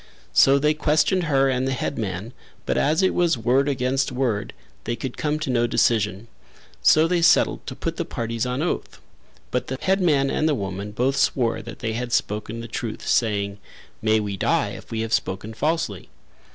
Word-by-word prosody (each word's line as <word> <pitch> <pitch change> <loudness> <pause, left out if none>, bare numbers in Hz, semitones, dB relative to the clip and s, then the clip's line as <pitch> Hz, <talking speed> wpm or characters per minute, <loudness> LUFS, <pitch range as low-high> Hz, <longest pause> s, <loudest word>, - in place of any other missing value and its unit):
So 135 +1 +6
they 150 +2 +2
questioned 155 +4 +2
her 135 -3 +3
and 130 0 0
the 135 - 0
headman 110 -4 -3 0.3
but - - 0
as 160 +6 +2
it 190 - +3
was 170 -6 +2
word 130 +5 +2
against 135 0 0
word 125 -5 -1 0.3
they 120 - -1
could 130 0 -5
come 150 0 -1
to 155 -3 -3
no 120 -1 +2
decision; 105 -2 +1 0.5
so 155 - +5
they 175 0 +1
settled - - +3
to - - -5
put - - -4
the - - -1
parties 115 -1 -3
on 125 +4 -1
oath, 175 - -3 0.5
but 125 - -1
the 130 - -3
headman 170 -8 +2
and 155 - +1
the 150 - +2
woman 100 -1 -4
both 130 +6 0
swore 125 -3 +1
that 115 -1 -9
they 110 -1 -2
had 120 +1 -4
spoken 105 +2 -1
the 115 - -7
truth, 115 -3 -5
saying, 100 -3 +1 0.4
"May 110 0 +3
we 100 -2 -3
die - - +1
if - - -10
we 110 -1 -2
have 115 0 -3
spoken 95 +4 -2
falsely." 145 - -2
125 Hz, 190 wpm, -23 LUFS, 110-145 Hz, 0.5 s, So